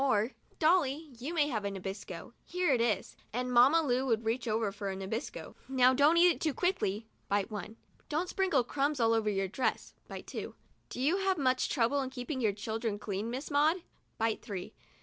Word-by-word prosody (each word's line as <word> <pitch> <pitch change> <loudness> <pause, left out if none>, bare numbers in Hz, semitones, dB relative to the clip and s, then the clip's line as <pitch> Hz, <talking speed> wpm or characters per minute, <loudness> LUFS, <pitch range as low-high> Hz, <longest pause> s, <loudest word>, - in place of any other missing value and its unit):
Or, 225 -3 +2 0.3
'Dolly, 310 -3 +2
you 270 +6 -4
may 310 -4 +2
have 215 -6 -2
a 200 - -1
Nabisco. 195 0 -7
Here 360 -4 +1
it 240 - +2
is," 215 -5 0 0.2
and 250 +2 -2
Mamma 270 +7 +6
Lu 255 -2 +1
would 225 -2 +1
reach 235 +2 -1
over 220 -1 0
for 200 0 -5
a 190 - -3
Nabisco. 195 +5 -5
"Now, 260 -1 +4
don't 290 +5 +5
eat 350 +1 +7
it - - -5
too 310 -5 0
quickly" 225 - 0 0.2
(bite 200 0 0
one). 215 +2 -6 0.2
" - - -34
Don't 315 +4 0
sprinkle 355 -9 +2
the - - -25
crumbs 285 0 0
all 230 -1 +4
over 220 -1 +2
your 195 -1 0
dress 245 +7 -2
' - - -37
(bite - - -8
two). - - -6 0.3
"Do - - -7
you 300 +8 +2
have 385 -1 +1
much 255 -3 +1
trouble 265 +2 +2
in 260 - -3
keeping 260 +1 -4
your 220 -3 +3
children 220 +1 -3
clean, 205 +1 -3
Miss 260 +6 -5
Maud 310 +5 +3 0.2
?" - - -43
(bite 225 -1 0
three). 190 -4 -6
245 Hz, 215 wpm, -31 LUFS, 215-290 Hz, 0.3 s, eat